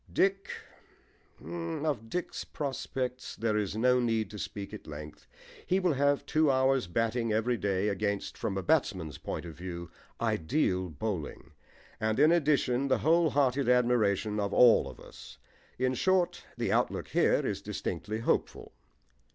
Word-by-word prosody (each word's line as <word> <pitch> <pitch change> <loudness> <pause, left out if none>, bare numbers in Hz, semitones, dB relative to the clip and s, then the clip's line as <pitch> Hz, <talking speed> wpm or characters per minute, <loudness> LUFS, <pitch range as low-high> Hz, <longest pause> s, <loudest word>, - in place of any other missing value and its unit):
DICK 195 0 +1 1.0
Of 105 - -3
Dick's 180 +6 -3
prospects 130 -3 -4
there 110 -1 0
is 105 -1 -1
no 125 +2 +4
need 115 -3 0
to 105 - -8
speak 100 0 -6
at - - -9
length. 75 0 -9 0.4
He 185 - +1
will 180 -4 +2
have 140 +1 +1
two 155 -1 +2
hours' 130 -3 +2
batting 115 +4 0
every 115 +3 +1
day 100 -2 0
against, 100 0 -2
from 95 - -3
a 95 - -2
batsman's 95 - 0
point - - -5
of 85 - -7
view, 85 0 -7 0.3
ideal 90 - 0
bowling, 80 -1 -5 0.5
and 110 +2 0
in 150 +3 +6
addition 140 -5 +2
the 135 - +3
whole 165 +1 +4
hearted 135 -1 +1
admiration 110 -4 +2
of 100 -1 -1
all 115 - +6
of 65 - -12
us. - - -13 0.4
In 130 0 +1
short, 185 +4 +1
the - - -1
outlook - - 0
here - - +2
is - - -2
distinctly 110 +2 -4
hopeful. - - -1
115 Hz, 150 wpm, -30 LUFS, 100-140 Hz, 1.0 s, in